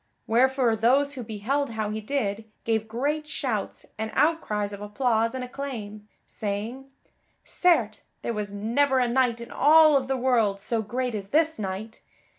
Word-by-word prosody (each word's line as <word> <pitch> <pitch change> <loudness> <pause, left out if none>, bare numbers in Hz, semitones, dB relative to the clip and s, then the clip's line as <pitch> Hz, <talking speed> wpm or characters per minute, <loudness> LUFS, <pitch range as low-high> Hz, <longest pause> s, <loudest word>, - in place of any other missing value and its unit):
Wherefore 250 0 +3
those 265 +6 +3
who 260 - -6
beheld 230 +7 -2
how 215 -1 -2
he 215 0 -4
did 215 -3 -2 0.2
gave 220 -1 0
great 290 +7 -2
shouts 250 -8 -3
and 220 0 -2
outcries 240 -9 +1
of 200 - -8
applause 230 +2 0
and 260 - -3
acclaim, 235 -6 -6 0.2
saying: 220 +6 -5 0.5
"Certes, 245 - +2 0.2
there 235 - -2
was 210 -2 -3
never 250 +5 +1
knight 240 -1 +1
in 235 +1 -9
all 310 0 +6
of 265 -2 +1
the 265 0 0
world 235 -6 +2
so 225 +3 -1
great 245 +3 -3
as 200 -2 -4
this 315 +3 +2
knight. 205 +3 -5
235 Hz, 155 wpm, -26 LUFS, 215-270 Hz, 0.5 s, all